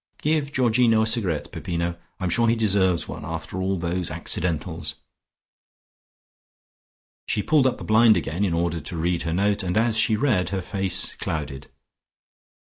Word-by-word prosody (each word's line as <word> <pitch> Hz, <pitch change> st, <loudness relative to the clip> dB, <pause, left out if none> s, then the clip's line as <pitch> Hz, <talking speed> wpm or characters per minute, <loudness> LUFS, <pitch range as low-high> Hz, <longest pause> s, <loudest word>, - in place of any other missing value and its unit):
Give 150 Hz, -2 st, +1 dB
Georgino 120 Hz, -4 st, +3 dB
a -, -, +1 dB
cigarette, 100 Hz, -9 st, -1 dB
Peppino! 85 Hz, 0 st, -3 dB, 0.2 s
I -, -, -6 dB
am 90 Hz, -, 0 dB
sure 115 Hz, +5 st, +3 dB
he 115 Hz, -, +3 dB
deserves 95 Hz, -6 st, +2 dB
one, -, -, -7 dB
after 80 Hz, +4 st, -5 dB
all 95 Hz, +1 st, 0 dB
those 85 Hz, 0 st, -2 dB
accidentals." 80 Hz, 0 st, -2 dB, 2.3 s
She 105 Hz, -, 0 dB
pulled 150 Hz, -4 st, +3 dB
up 130 Hz, -, -1 dB
the -, -, -8 dB
blind 110 Hz, 0 st, +5 dB
again 85 Hz, +6 st, -2 dB
in 90 Hz, -5 st, +1 dB
order 85 Hz, 0 st, -1 dB
to 85 Hz, -, -6 dB
read 85 Hz, +1 st, 0 dB
her 80 Hz, +1 st, -2 dB
note 100 Hz, +2 st, +1 dB
and 90 Hz, +1 st, -2 dB
as 115 Hz, 0 st, +2 dB
she 110 Hz, -1 st, +2 dB
read 105 Hz, -7 st, +1 dB
her 95 Hz, -2 st, -3 dB
face 95 Hz, 0 st, 0 dB
clouded. 70 Hz, -4 st, -5 dB
95 Hz, 160 wpm, -24 LUFS, 85-110 Hz, 2.3 s, blind